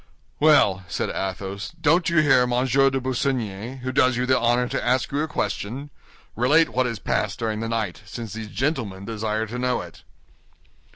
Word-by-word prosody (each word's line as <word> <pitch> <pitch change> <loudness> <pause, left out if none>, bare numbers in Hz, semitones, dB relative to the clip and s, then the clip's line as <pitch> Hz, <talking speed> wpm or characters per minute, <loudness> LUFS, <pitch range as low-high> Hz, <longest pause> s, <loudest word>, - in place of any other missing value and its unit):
"Well," 140 - +4
said - - -2
Athos, 95 - -4
"don't 160 +2 +3
you 160 -2 +4
hear 125 -4 +4
Monsieur 130 +2 +3
de 135 0 -1
Busigny, 125 -2 -2
who 130 +1 -3
does 130 -2 +3
you 125 - 0
the 130 0 +3
honor 120 +1 +2
to 135 +2 -3
ask 125 +1 +1
you 140 +2 0
a 155 - -1
question? 120 +5 -3 0.4
Relate 145 +8 +4
what 130 0 +1
has 115 -2 -3
passed - - -1
during 110 -2 -2
the 115 0 -3
night, 110 -5 -2
since 115 -1 -7
these 110 0 -6
gentlemen 110 -7 -2
desire 110 0 -2
to 120 +3 -6
know 125 0 0
it." - - -12
125 Hz, 180 wpm, -24 LUFS, 110-135 Hz, 0.4 s, Well